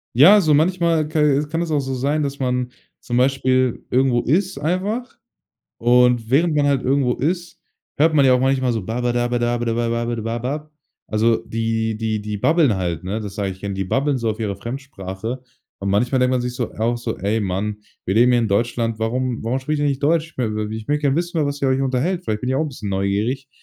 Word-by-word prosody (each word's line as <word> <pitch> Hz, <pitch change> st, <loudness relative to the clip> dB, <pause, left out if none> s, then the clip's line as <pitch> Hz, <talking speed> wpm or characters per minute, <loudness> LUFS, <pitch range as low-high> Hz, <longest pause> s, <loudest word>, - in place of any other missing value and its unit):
Ja, 185 Hz, -, +8 dB
so 155 Hz, -5 st, +3 dB
manchmal 165 Hz, -1 st, +2 dB
ka 155 Hz, 0 st, 0 dB
e 145 Hz, 0 st, +2 dB
kann 165 Hz, +2 st, -1 dB
es 165 Hz, -, -3 dB
auch 150 Hz, -, +2 dB
so 135 Hz, 0 st, -3 dB
sein, 145 Hz, +4 st, 0 dB
dass 140 Hz, 0 st, -4 dB
man, 125 Hz, -1 st, -1 dB, 0.3 s
zum 120 Hz, -, -3 dB
Beispiel, 130 Hz, -1 st, +1 dB
irgendwo 125 Hz, -1 st, +3 dB
ist 180 Hz, +2 st, 0 dB
einfach 195 Hz, -, -2 dB, 0.6 s
und 120 Hz, -1 st, +3 dB
während 160 Hz, +4 st, +3 dB
man 145 Hz, -1 st, +2 dB
halt 140 Hz, -2 st, +2 dB
irgendwo 130 Hz, -2 st, +1 dB
ist, 175 Hz, +5 st, -2 dB, 0.4 s
hört 160 Hz, +2 st, +4 dB
man 140 Hz, -3 st, +5 dB
ja 130 Hz, -, +6 dB
auch 125 Hz, -, +2 dB
manchmal 130 Hz, -1 st, +1 dB
so 110 Hz, -5 st, -3 dB
Babadabadabababab. 120 Hz, +2 st, -1 dB, 0.4 s
Also, 110 Hz, +1 st, +3 dB
die 115 Hz, -1 st, -1 dB
die 110 Hz, -1 st, -2 dB
die 105 Hz, 0 st, -4 dB
babbeln 155 Hz, -, +3 dB
halt, 85 Hz, -3 st, -2 dB
ne? 100 Hz, +4 st, -2 dB
Das 100 Hz, -2 st, -7 dB
sage 100 Hz, -2 st, -1 dB
ich 95 Hz, -, -15 dB
gern, 100 Hz, -1 st, -4 dB
die 95 Hz, 0 st, -2 dB
babbeln 135 Hz, +6 st, 0 dB
so 115 Hz, -1 st, -1 dB
auf 110 Hz, -, -2 dB
ihre 105 Hz, -3 st, -2 dB
Fremdsprache. 115 Hz, -2 st, -6 dB, 0.4 s
Und 100 Hz, -, -4 dB
manchmal 120 Hz, +7 st, +1 dB
denkt 125 Hz, 0 st, +2 dB
man 125 Hz, -1 st, +1 dB
sich 125 Hz, 0 st, -3 dB
so 120 Hz, -2 st, -3 dB
auch 120 Hz, +2 st, 0 dB
so: 115 Hz, -1 st, -4 dB
„Ey 105 Hz, +4 st, -1 dB
Mann, 100 Hz, +2 st, -2 dB, 0.3 s
wir 95 Hz, -, -1 dB
leben 120 Hz, +3 st, +5 dB
hier 120 Hz, -, +4 dB
in 110 Hz, -, 0 dB
Deutschland, 115 Hz, +2 st, 0 dB
warum 120 Hz, +2 st, -1 dB
warum 120 Hz, +4 st, -1 dB
spricht 150 Hz, +2 st, -2 dB
ihr 145 Hz, -, +2 dB
nicht 140 Hz, -1 st, -1 dB
Deutsch? 160 Hz, +2 st, +1 dB
W 125 Hz, -, 0 dB, 0.2 s
w 110 Hz, -, -5 dB
ich 110 Hz, -1 st, -8 dB
möchte 150 Hz, +1 st, 0 dB
gern 140 Hz, 0 st, +2 dB
wissen, 170 Hz, 0 st, -1 dB
über 150 Hz, -, +2 dB
was 145 Hz, 0 st, -4 dB
ihr 135 Hz, -, +3 dB
euch 130 Hz, +1 st, +1 dB
unterhält. 135 Hz, +8 st, 0 dB
Vielleicht 105 Hz, 0 st, -2 dB
bin 125 Hz, -, -1 dB
ich 130 Hz, -, +1 dB
auch 155 Hz, -, +1 dB
'n 155 Hz, -, -2 dB
bisschen 110 Hz, -7 st, -6 dB
neugierig.” 105 Hz, +8 st, -1 dB
125 Hz, 220 wpm, -21 LUFS, 115-145 Hz, 0.6 s, Ja